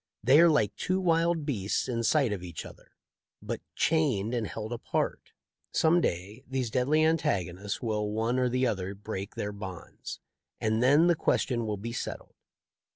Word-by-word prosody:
They 130 +6 +6
are 170 0 +8
like 110 -10 +2
two 185 +1 0
wild 165 -3 +2
beasts 105 -8 -1
in 120 -2 -1
sight 130 -1 +2
of 95 - -4
each 85 -3 -7
other, - - -14 0.4
but - - -5
chained 130 -9 +1
and 115 -4 -1
held 110 +2 -5
apart. 115 - -2 0.4
Some 170 +2 +4
day 100 - -3
these 130 -3 -2
deadly 145 +6 +3
antagonists 105 - -1
will 105 -2 -1
one 115 +4 0
or 125 -1 +2
the 130 +1 +1
other 95 -4 -2
break 100 -1 -6
their 105 - -3
bonds, 95 -4 -8 0.4
and 110 +1 +1
then 145 +6 +5
the 175 - +5
question 120 -7 0
will 105 -1 -2
be 115 +4 -5
settled." - - -5
115 Hz, 165 wpm, -29 LUFS, 105-145 Hz, 0.4 s, are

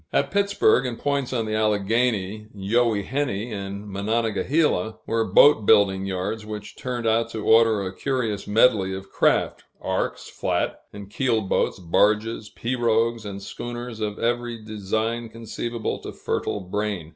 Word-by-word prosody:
At - - +1
Pittsburg, 200 - +3
and 120 -2 -4
points 140 -2 -1
on 115 -3 -1
the 110 - -3
Alleghany, 105 0 0
Youghiogheny, 115 +2 0
and 100 0 -6
Monongahela, 110 - 0
were 115 0 +1
boat 110 -1 +6
building 95 -3 +4
yards 95 +4 -3
which 105 -1 -7
turned 125 -2 -4
out 115 +1 +2
to 110 -2 -5
order 110 -2 +5
a 95 0 -5
curious 115 -6 -2
medley 105 -3 +3
of 95 0 -9
craft - - +1 0.2
arks, - - -2
flat - - -2
and 100 -1 -9
keel 120 -1 +1
boats, 95 - 0
barges, 105 +5 +1
pirogues, 115 -2 0
and 100 -1 -6
schooners 120 0 -6
of 105 -1 -3
every 120 -1 -2
design 110 +2 -2
conceivable 115 +1 -4
to - - -7
fertile 105 - -2
brain. 100 -3 -3
110 Hz, 140 wpm, -24 LUFS, 100-120 Hz, 0.2 s, boat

